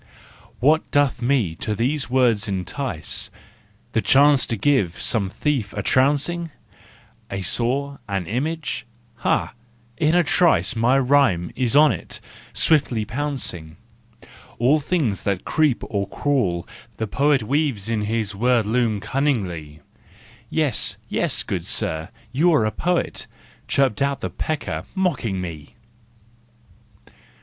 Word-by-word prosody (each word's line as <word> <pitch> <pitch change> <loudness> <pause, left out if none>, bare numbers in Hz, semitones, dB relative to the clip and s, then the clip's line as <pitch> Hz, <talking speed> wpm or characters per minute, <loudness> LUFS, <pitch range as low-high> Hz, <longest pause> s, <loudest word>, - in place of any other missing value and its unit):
What 155 +5 +3
doth 145 -4 +2
me 120 -9 +1
to 105 - -2
these 125 +2 -1
woods 125 -5 +2
entice? 95 - -3 0.6
The - - +1
chance 140 0 +4
to 115 - -2
give 100 -7 +1
some 100 -5 0
thief 120 -3 -1
a 105 - -3
trouncing 145 - +2 0.8
A 100 -1 -4
saw, 130 +8 -1
an 95 -3 -1
image? 150 - -3 0.3
Ha, 120 - 0 0.4
in 155 +1 +2
a 175 - +5
trice 170 -4 +3
My 120 +4 +3
rhyme 130 -11 +3
is 125 0 0
on 150 -1 +7
it, 95 - -4 0.3
swiftly 130 -8 +2
pouncing! 115 - -3 0.8
All 135 +6 +3
things 145 - -1
that 100 -2 -2
creep 155 -6 +1
or 100 -3 -2
crawl 100 -12 -1 0.3
the 110 - -1
poet 140 +3 +2
Weaves 135 -5 0
in 110 -2 -1
his 110 -1 -1
word 120 +2 +2
loom 110 -2 0
cunningly. 90 - -2 0.7
"Yes, 150 -8 +1
yes, - - 0
good - - -4
sir, 80 0 0 0.2
you 160 +7 +3
are 125 - +3
a 110 - 0
poet," 175 +6 -1 0.4
Chirped 135 -2 +1
out 140 0 0
the - - -3
pecker, 155 -2 -3
mocking 145 - 0
me. 80 -5 -7
125 Hz, 125 wpm, -22 LUFS, 100-145 Hz, 0.8 s, on